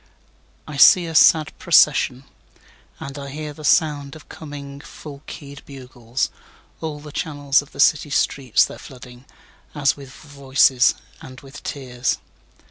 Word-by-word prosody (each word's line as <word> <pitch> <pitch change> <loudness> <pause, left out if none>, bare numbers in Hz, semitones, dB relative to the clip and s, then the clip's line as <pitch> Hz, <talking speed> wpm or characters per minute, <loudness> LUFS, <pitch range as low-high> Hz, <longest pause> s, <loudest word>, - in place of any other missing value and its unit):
3I 150 -3 -7
see 180 -2 +7
a 165 - -6
sad 155 -1 +4
procession, 140 -6 +3 0.8
And 140 +1 -8
I 140 0 -7
hear 150 +1 -7
the 155 - -13
sound 145 -2 +1
of 155 - -15
coming 140 -2 -9
full 140 -1 -11
key'd 140 -1 -10
bugles; 125 -2 -5 0.5
All 155 -2 -5
the 150 0 -11
channels 145 -2 0
of 145 - -17
the - - -14
city 150 0 +3
streets 135 -4 +1
they're - - -10
flooding, 125 -1 -13 0.5
As 140 -2 +1
with 140 -2 -12
voices 135 -2 +2 0.3
and 130 -1 -11
with 135 0 -12
tears. 125 -3 -3
140 Hz, 140 wpm, -21 LUFS, 135-150 Hz, 0.8 s, see